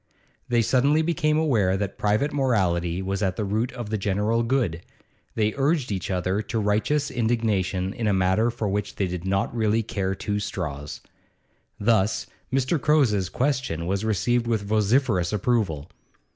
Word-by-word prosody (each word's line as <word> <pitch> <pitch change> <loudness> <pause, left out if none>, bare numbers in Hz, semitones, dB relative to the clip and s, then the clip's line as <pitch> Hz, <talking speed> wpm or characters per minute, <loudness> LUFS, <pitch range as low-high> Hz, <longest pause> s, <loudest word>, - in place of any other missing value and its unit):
They 120 -1 +3
suddenly 140 +7 +3
became 155 -2 +1
aware 110 -12 +2
that 100 -1 -4
private 105 +8 +1
morality 95 -10 +1
was 95 +1 -2
at 95 -3 0
the 105 - -2
root 110 +5 -1
of 120 -4 -6
the 110 - -1
general 105 +4 +1
good; 115 -9 0 0.5
they 110 -1 +1
urged 140 -2 +1
each 95 -3 -3
other 95 +2 0
to 110 +2 -4
righteous 110 +8 +1
indignation 105 -6 0
in 115 - -2
a - - +3
matter 95 +4 +2
for 115 -2 -3
which 100 +1 -2
they 100 - 0
did 90 -1 -5
not 95 +4 0
really 110 0 +1
care 95 -2 -2
two 105 +2 -2
straws. 75 -7 -5 0.8
Thus 105 -1 +2 0.3
Mr. 135 +3 +1
Cowes's 115 - +3
question 125 - -1
was 95 +3 -1
received 115 +3 +1
with 110 -3 0
vociferous 105 -2 +1
approval. 105 - 0
105 Hz, 160 wpm, -25 LUFS, 95-120 Hz, 0.8 s, They